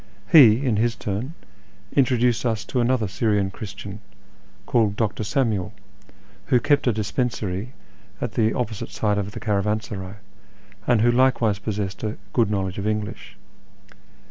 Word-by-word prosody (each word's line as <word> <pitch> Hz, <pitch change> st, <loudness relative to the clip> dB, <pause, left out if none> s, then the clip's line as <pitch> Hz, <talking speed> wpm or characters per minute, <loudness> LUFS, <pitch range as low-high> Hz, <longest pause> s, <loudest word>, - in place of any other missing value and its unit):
He, 130 Hz, -4 st, +7 dB
in 115 Hz, -5 st, +1 dB
his 115 Hz, +1 st, +1 dB
turn, 105 Hz, -, -4 dB, 0.6 s
introduced 125 Hz, -3 st, +3 dB
us 110 Hz, -3 st, -1 dB
to 125 Hz, +3 st, -1 dB
another 120 Hz, -2 st, +1 dB
Syrian 100 Hz, 0 st, 0 dB
Christian, 100 Hz, +1 st, -8 dB, 0.7 s
called 110 Hz, -5 st, +2 dB
Dr. 110 Hz, 0 st, -1 dB
Samuel, 105 Hz, -4 st, 0 dB, 0.7 s
who 125 Hz, -3 st, +4 dB
kept 145 Hz, +2 st, +2 dB
a -, -, +5 dB
dispensary 110 Hz, 0 st, -2 dB, 0.5 s
at -, -, -3 dB
the 110 Hz, -1 st, +2 dB
opposite 110 Hz, -4 st, -3 dB
side 105 Hz, -1 st, 0 dB
of 100 Hz, +1 st, -4 dB
the -, -, -6 dB
caravansaray, 105 Hz, -2 st, -2 dB, 0.7 s
and 120 Hz, -3 st, +4 dB
who 120 Hz, +1 st, +4 dB
likewise 120 Hz, -5 st, +2 dB
possessed 105 Hz, -1 st, -4 dB
a 110 Hz, 0 st, -3 dB, 0.2 s
good 115 Hz, -4 st, +3 dB
knowledge 95 Hz, -2 st, -2 dB
of 100 Hz, -, -2 dB
English. 105 Hz, -1 st, -4 dB
110 Hz, 140 wpm, -23 LUFS, 100-120 Hz, 0.7 s, He